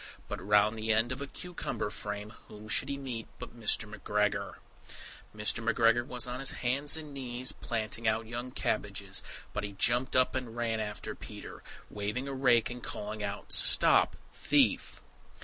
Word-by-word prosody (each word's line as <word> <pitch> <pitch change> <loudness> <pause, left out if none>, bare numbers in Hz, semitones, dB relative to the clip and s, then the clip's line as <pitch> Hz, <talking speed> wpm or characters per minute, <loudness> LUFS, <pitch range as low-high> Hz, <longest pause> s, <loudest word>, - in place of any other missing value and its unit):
But - - -5
round 105 +2 +4
the 110 +1 0
end 110 +3 +3
of 130 +2 -4
a 140 - -4
cucumber 175 -9 -4
frame, 105 0 -5 0.2
whom 105 0 -11
should 135 +5 0
he 140 - -2
meet 125 -5 -5
but - - -9
Mr. 110 -1 +2
McGregor! 105 0 -1 0.8
Mr. 105 +2 -1
McGregor 115 +1 +4
was 125 0 -1
on 125 0 -4
his 135 - +3 0.2
hands 140 +5 +4
and 150 -2 -8
knees 130 -2 -2
planting 110 0 -2
out 110 +1 +2
young 120 +3 -5
cabbages, - - -2 0.3
but 105 - -2
he 100 -1 -4
jumped 120 +6 +1
up 130 0 +4
and 125 -3 -4
ran 115 -2 0
after 105 -1 -4
Peter, - - -9 0.3
waving 105 +6 -3
a 140 - -3
rake 125 -4 +4
and 125 0 -7
calling 105 -1 -5
out, 100 0 -4
"Stop - - +5 0.2
thief." - - +2
115 Hz, 165 wpm, -31 LUFS, 105-125 Hz, 0.8 s, Stop